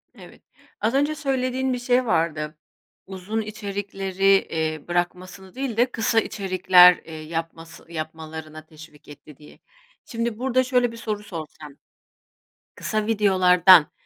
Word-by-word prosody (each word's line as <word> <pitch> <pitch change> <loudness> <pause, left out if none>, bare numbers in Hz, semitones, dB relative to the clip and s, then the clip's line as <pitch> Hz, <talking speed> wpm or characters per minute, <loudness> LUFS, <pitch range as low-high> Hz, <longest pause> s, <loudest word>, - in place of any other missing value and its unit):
Evet. - - -15 0.4
Az 220 +3 0
önce 290 +3 +1
söylediğin 260 -2 -1
bir 250 - -3
şey 245 +1 +1
vardı, 155 -6 -1 0.5
"Uzun 190 +4 -4
içerikleri, 200 -3 -6
eee, 160 -6 +1
bırakmasını 180 +2 -4
değil 260 -4 -4
de 245 +2 +2
kısa 225 -1 +1
içerikler, 185 -3 +5
eee, 160 - -11
yapması 165 +1 -7
yapmalarına 155 -1 -8
teşvik 155 -1 -16
etti." 145 -1 -14
diye. 150 - -17 0.5
Şimdi 230 -1 -4
burada 255 0 +1
şöyle 250 -2 +1
bir 230 - -11
soru 215 -2 -4
sorsam, 155 -6 -9 1.0
kısa 215 -1 -2
videolardan 185 -5 +5
190 Hz, 125 wpm, -23 LUFS, 165-230 Hz, 1.0 s, içerikler